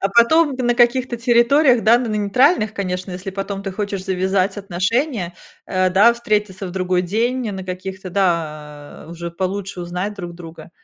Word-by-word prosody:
А 195 - +1
потом 275 +8 +4
на 240 -2 +1
каких-то 240 +1 +2
территориях, 240 +2 +4
да, 225 - +6
н 250 - -1
на - - -4
нейтральных, 215 - +2
конечно, 185 -1 -4
если 185 +2 -6
потом 195 +1 -5
ты 195 - -4
хочешь 200 -1 -4
завязать 190 +1 0
отношения, 195 - -1 0.3
э, 185 -1 +1
да, 205 +6 +6
встретиться 210 -4 -2
в 180 - -6
другой 185 -1 0
день, 230 +5 -1
на 190 -2 -6
каких-то, 185 0 -6
да 155 -7 -3
Уже 170 0 -6
получше 190 +1 -4
узнать 180 +4 -4
друг 175 -4 -7
друга, 170 -1 -11
195 Hz, 165 wpm, -20 LUFS, 180-235 Hz, 0.3 s, да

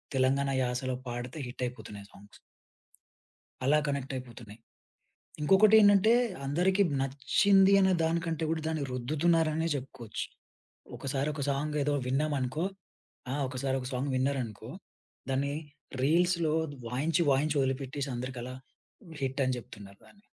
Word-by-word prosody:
తెలంగాణ 135 +1 +2
యాసలో 125 +1 -2
పాడితే 120 +4 -5
హిట్ 125 +1 -6
అయిపోతున్నాయి 105 -5 -9
ఆ - - -25
సాంగ్స్. 100 +1 -16 1.3
అలా 145 +3 +4
కనెక్టయిపోతున్నాయి. 125 -5 -5 0.8
ఇంకొకటేంటంటే, 205 +4 +6 0.3
అందరికి 180 +7 +2 0.2
నచ్చింది 190 +9 +3
అనే 190 -1 +4
దానికంటే 165 -1 -1
గూడా, 160 -1 -1
దాన్ని 155 -3 -2
రుద్దుతున్నారనే 155 +5 +1
జెప్పుకోవచ్చు. 130 -5 -5 0.7
ఒకసారి 135 +1 -2
ఒక 145 - -4
సాంగ్ 150 +2 -2
ఏదో 145 0 +1
విన్నామనుకో, 140 +2 0 0.7
ఆ! - - -1
ఒకసారి 130 0 -2
ఒక 125 - -5
సాంగ్ 135 +2 -1
విన్నారనుకో, 125 -5 -2 0.6
దాన్ని 140 +2 0 0.5
రీల్స్‌లో 170 +1 +2 0.3
వాయించి 150 +9 0
వాయించి, 145 +2 +1
ఒదిలిపెట్టేసి, 135 +1 -3
అందరికలా 125 0 -5 0.7
హిట్ 135 +1 -1
అని 130 0 0
జెప్తున్నారు 100 -3 -11
దాన్ని. 205 - -22
140 Hz, 110 wpm, -30 LUFS, 130-160 Hz, 1.3 s, ఇంకొకటేంటంటే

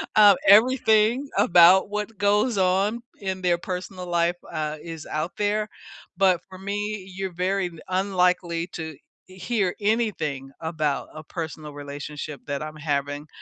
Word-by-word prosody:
Uh, 205 -2 +8
everything 225 +3 +5
about 180 +3 +6
what 210 0 -4
goes 205 +3 +2
on 195 +5 +2 0.2
in 190 -1 -3
their 175 -1 +2
personal 180 +1 -6
life, 175 0 +1 0.2
uh, 155 0 -3
is 165 -2 -8
out 155 +4 -2
there, 210 +1 0 0.5
but 190 -3 +4
for 185 - -10
me, 200 0 -4
you're 190 -2 -4
very 185 +1 0
d 165 - -14
unlikely 180 -3 +1
to 160 -3 -6 0.3
e 185 - -13
hear 190 -1 0
anything 200 - -1
about 155 -3 -1
a 155 - -8
personal 155 -2 -6
relationship 145 0 -7
that 140 +1 -3
I'm 155 0 -7
having. 145 0 -2
180 Hz, 145 wpm, -24 LUFS, 155-205 Hz, 0.5 s, Uh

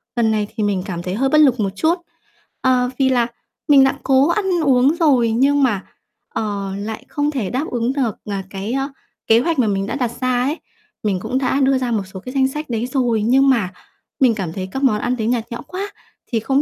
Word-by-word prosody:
lần 230 -2 +2
này 210 -1 0
thì 220 - -1
mình 200 -3 0
cảm 175 -4 -4
thấy 180 +1 -3
hơi 270 +5 +1
bất 305 - +3
lực 260 -5 +4
một 200 -2 +1
chút, 325 - +2 0.7
ờ, 250 -1 +2
vì 265 -1 +4
là 245 -2 +2 0.4
mình 280 -2 +7
đã 270 +1 +2
cố 270 +1 +4
ăn 395 +4 +1 0.2
uống 265 +2 +4
rồi 270 -9 +3
nhưng 275 +5 +3
mà, 210 -7 +1 0.4
ờ, 200 -3 -3
lại 215 +2 -6
không 290 0 0
thể 245 -10 -2
đáp 260 +5 -1
ứng 240 +1 0
được, 255 -7 -1
ờ, 205 -1 -3
cái, 200 +4 -4
ơ, 270 +1 -1 0.4
kế 225 +1 +6
hoạch 320 +4 0
mà 230 - +3
mình 195 -1 -1
đã - - -3
đặt 250 -4 -1
ra 255 -1 +1
ấy. 290 +6 -1 0.4
Mình 195 -3 0
cũng 255 - -2
đã 265 +1 +1
đưa 270 0 +3
ra 250 -2 -2
một 215 -3 0
số 190 - -6
cái 255 +7 -8
danh 265 -1 +3
sách 300 +2 -6
đấy 235 0 -1
rồi, 240 -5 +1
nhưng 265 +4 +4
mà 210 -8 +1 0.5
mình 245 -5 +4
cảm 180 -6 -4
thấy 185 0 -5
các 270 +5 -4
món 215 -6 +3
ăn 245 +3 0
đấy 220 - -1
nhạt 235 -1 -1
nhẽo 235 - -5
quá, 400 +2 -5 0.3
thì 230 - 0
không 270 +5 +1
250 Hz, 240 wpm, -19 LUFS, 215-270 Hz, 0.7 s, mình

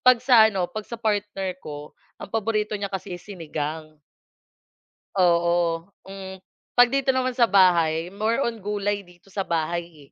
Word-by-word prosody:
'pag 255 -1 +5
sa 230 -4 +7
ano, 190 -4 -1
'pag 215 -1 -6
sa 235 - -5
partner 205 -4 -1
ko, 150 0 -8 0.2
ang 200 - -10
paborito 215 -1 0
niya 200 - -2
kasi 190 0 -5
is 180 - -22
sinigang. 155 -3 -5 1.2
Oo, 170 -2 +2 0.2
hmm, 190 -1 -9 0.3
'pag 245 0 +6
dito 275 -1 0
naman 255 0 +1
sa 240 -1 +3
bahay 175 -4 +3
more 220 +6 0
on 230 -1 -2
gulay 205 0 -1
dito 180 0 -18
sa 195 0 -3
bahay 165 -2 -3
195 Hz, 155 wpm, -24 LUFS, 170-215 Hz, 1.2 s, sa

